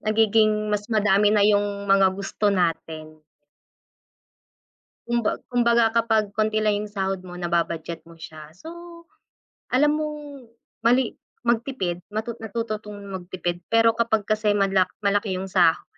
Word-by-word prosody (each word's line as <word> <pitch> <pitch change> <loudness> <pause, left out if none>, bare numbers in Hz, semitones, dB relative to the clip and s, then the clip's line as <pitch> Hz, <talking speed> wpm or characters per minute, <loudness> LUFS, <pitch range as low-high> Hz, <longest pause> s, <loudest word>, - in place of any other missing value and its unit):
nagiging 215 -1 +2
mas 205 0 -2
madami 210 -2 +3
na 210 -1 +3
yung 205 -1 +1
mga 195 -1 +4
gusto 200 +2 -2
natin. 160 -4 -2 1.9
Kumba 235 -2 0
kumbaga, 235 -1 +3
kapag 225 -2 +3
konti 215 0 +1
lang 210 -1 +1
yung 210 - -9
sahod 195 -2 -2
mo, 180 - -9
naba-budget 170 -1 -2
mo 165 0 -16
siya. 155 -1 -11
So, 185 - -13 1.0
alam 295 +4 +3
mong 295 -4 -6 0.4
mali 245 0 +2 0.3
magtipid, 225 -7 -1
matu 220 +2 -3
natuto 225 0 -3
'tong 210 -1 -10
magtipid. 175 -2 -5
Pero 230 0 +4
kapag 225 -2 +1
kasi 215 -1 +1
mala 195 -2 +2 0.2
malaki 200 -1 +1
yung 190 +1 -4
sahod, 175 -4 +3
210 Hz, 130 wpm, -24 LUFS, 185-225 Hz, 1.9 s, mga